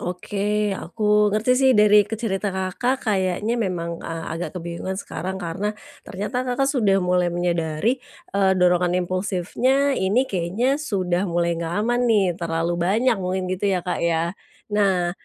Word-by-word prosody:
Oke, 205 +3 -1
aku 210 +2 +1
ngerti 215 +4 +2
sih 265 -1 +5
dari 210 -1 +6
ke 225 - -4
cerita 205 -3 -2
Kakak, 215 +8 -1
kayaknya 195 +3 0
memang 170 -5 -2
a 165 0 -5
agak 175 +2 -5
kebingungan 170 +2 -4
sekarang, 190 -1 -5
karena 195 +5 -3 0.3
ternyata 210 +7 -3
Kakak 260 +2 +1
sudah 215 -8 +2
mulai 180 0 +2
menyadari, 175 +6 0 0.3
eee, 195 -1 +3
dorongan 180 0 +3
impulsifnya 205 +10 0
ini 200 +8 +2
kayaknya 205 - 0
sudah 190 -8 -1
mulai 170 0 0
gak 170 +5 -2
aman 240 +1 +1
nih, 200 -6 +3
terlalu 170 0 -1
banyak 220 +8 +2
mungkin 185 0 -2
gitu 185 +2 -1
ya 185 -2 +1
Kak 180 - -2
ya? 170 +1 +1 0.4
Nah, 190 -4 +2
190 Hz, 150 wpm, -23 LUFS, 175-210 Hz, 0.4 s, dari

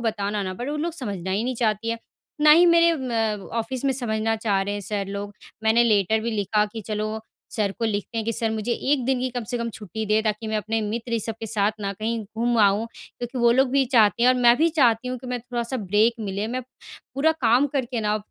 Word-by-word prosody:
बताना 205 -1 -2
ना, 185 -1 -4
बट 245 +7 -5
वो 300 - -2
लोग 330 +2 -2
समझना 200 - -5
ही 205 +5 0
नहीं 255 0 -1
चाहती 225 -1 0
हैं। 230 - -2 0.4
ना 300 - +6
ही 340 +3 +7
मेरे 335 0 +5
म 225 -5 -2
ऑफ़िस 260 +3 -3
में 270 - +2
समझना 225 -3 -1
चाह 205 -3 0
रहे 205 +1 -3
हैं 205 - -4
सर 200 0 -3
लोग, 200 0 -5 0.3
मैंने 225 +2 +4
लेटर 220 0 +2
भी 230 +1 -2
लिखा 210 0 +1
कि, 220 +2 -8
चलो, 215 +1 -3 0.3
सर 205 -3 -1
को 230 - -1
लिखते 215 +1 -2
हैं 220 - -2
कि 230 - -1
सर 225 0 0
मुझे 220 +2 -2 0.2
1 260 -4 +1
दिन 260 -1 +1
की 255 - 0
कम 245 -2 -4
से 245 - -1
कम 235 0 -2
छुट्टी 215 +1 -6
दें, 215 +1 +2
ताकि 215 +1 -1
मैं 215 - -1
अपने 220 +1 -1
मित्र, 230 +3 -4
ये 230 - +2
सब 225 +1 -3
के 225 - -4
साथ 210 0 +1
ना, 200 0 -2
कहीं 225 +3 -3 0.2
घूम 240 +1 +1
आऊँ, 205 +2 +3 0.3
क्योंकि 245 +1 -5
वो 235 0 +5
लोग 260 0 +3
भी 275 0 +3
चाहते 225 0 +4
हैं 250 - +6
और - - +3
मैं 240 0 +6
भी 330 +2 +3
चाहती 250 -5 +2
हूँ 255 - -3
कि 255 - -11
मैं 250 0 -2
थोड़ा-सा 240 +1 -3
ब्रेक 210 +2 +2
मिले, 200 0 -3
मैं 255 +1 -3 0.5
पूरा 315 +4 +3
काम 255 -1 +3
करके 245 -2 -1
ना, 210 0 +1
225 Hz, 250 wpm, -24 LUFS, 210-245 Hz, 0.5 s, ही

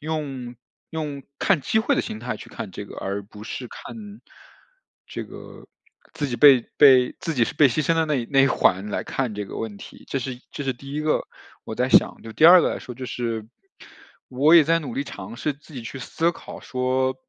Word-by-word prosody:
用 140 -6 -5 0.3
用 150 -3 -4 0.2
看 195 -6 +2
机 220 - +1
会 245 +6 +2
的 - - +1
形 110 - -6
态 125 +1 -4
去 - - -12
看 105 - -7
这 100 +3 -8
个， - - -11
而 100 +1 -3
不 105 +1 -13
是 125 +2 -6
看 210 - -10 0.9
这 - - -6
个 - - -12 0.5
自 145 - -2
己 125 -3 -3
被 140 -3 +8 0.2
被 130 -3 +6
自 165 - -2
己 125 -6 +2
是 - - -5
被 145 -2 +6
牺 130 +5 0
牲 165 - +2
的 165 0 +2
那 150 -2 +1
一 120 -3 -2
那 135 -1 +5
一 135 - +6
环 100 -6 +2
来 - - -2
看 125 -5 -3
这 105 0 -4
个 - - -8
问 105 -3 -5
题， - - -13
这 135 - -1
是 130 0 -4
一 125 - -17
这 - - -6
是 135 -1 -1
第 135 +3 -11
一 150 - -2
个， 155 0 +1 0.4
我 110 - -6
在 125 +3 0
想。 - - +4
就 110 - -9
第 155 - +2
二 175 +2 +10
个 - - +1
来 - - -4
说 125 - -9
就 130 +2 -7
是， 115 -3 -3 0.8
我 140 +6 +4
也 165 -3 +8
在 165 +3 +3
努 140 -8 -6
力 140 - -2
尝 105 -3 -9
试 150 - -1
自 145 +2 -18
己 125 - -6
去 125 +4 -7
思 165 +6 0
考 - - -10
说， 130 +1 0
135 Hz, 250 characters per minute, -23 LUFS, 120-155 Hz, 0.9 s, 二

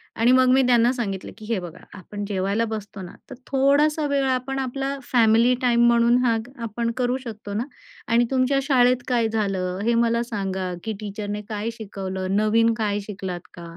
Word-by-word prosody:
आणि 230 +2 +3
मग 255 0 +5
मी 265 - +5
त्यांना 240 -1 +4
सांगितलं 200 -7 -4
की 215 - -11
हे 220 -2 -1
बघा 175 -1 -9 0.2
आपण 205 +2 -7
जेवायला 200 +3 0
बसतो 210 -2 -6
ना, 180 - -8 0.2
तर 260 - -8
थोडासा 285 +3 +2
वेळ 280 -1 +1
आपण 260 +1 -1
आपला 270 +1 -3
फॅमिली 230 0 +4
टाईम 240 -1 +3
म्हणून 235 0 +4
हा 235 -2 +3 0.3
आपण 230 +1 -2
करू 250 0 0
शकतो 215 -4 -7
ना. 215 +3 -1 0.4
आणि 235 +1 +3
तुमच्या 265 +1 +2
शाळेत 250 -2 +3
काय 240 -3 +2
झालं 195 -4 -2
हे 235 +2 +2
मला 235 0 +2
सांगा, 190 -5 -3
की 220 - -3
टीचरने 205 0 -5
काय 215 +1 -3
शिकवलं? 190 -3 -4
नवीन 225 +2 +3
काय 205 -2 -1
शिकलात 190 -3 -6
का? 175 - -11
230 Hz, 180 wpm, -23 LUFS, 205-250 Hz, 0.4 s, मग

